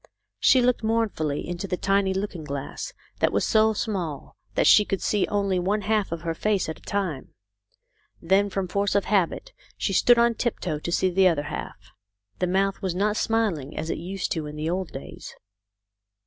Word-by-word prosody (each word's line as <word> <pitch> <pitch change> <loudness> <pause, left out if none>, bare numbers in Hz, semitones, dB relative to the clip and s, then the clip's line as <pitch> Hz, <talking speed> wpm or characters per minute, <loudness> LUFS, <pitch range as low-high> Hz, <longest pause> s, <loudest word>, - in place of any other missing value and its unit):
She 255 -2 +5
looked 250 0 +2
mournfully 220 -10 -1
into 175 +3 -4
the 180 - -2
tiny 195 0 +2
looking 190 -3 -3
glass 140 - -5 0.3
that - - +3
was - - +1
so 220 -1 +4
small 185 - -4 0.2
that - - +2
she 210 - +7
could 195 -2 -2
see 205 -2 +1
only 200 -3 0
one 200 +4 0
half 210 -2 0
of 170 -1 -4
her 165 -1 -1
face 205 +3 0
at 160 - -6
a - - -26
time. 185 -9 -3 0.8
Then 195 +4 +2
from 195 -1 -2
force 200 +2 0
of 200 - +2
habit 210 - 0 0.2
she - - -1
stood 240 -1 +5
on 235 0 +4
tiptoe 185 -9 -2
to 170 - -4
see 185 +2 +2
the 190 +1 +5
other 160 -5 +1
half. 100 0 -7 0.5
The 180 - +1
mouth 195 +2 0
was 185 -3 -2
not 205 +3 +1
smiling 205 -13 -1
as 160 - -2
it - - -3
used 185 +3 -4
to 160 -5 -2
in 150 - -8
the 155 +2 -2
old 185 -1 -3
days. 135 - -9
190 Hz, 190 wpm, -25 LUFS, 170-210 Hz, 0.8 s, she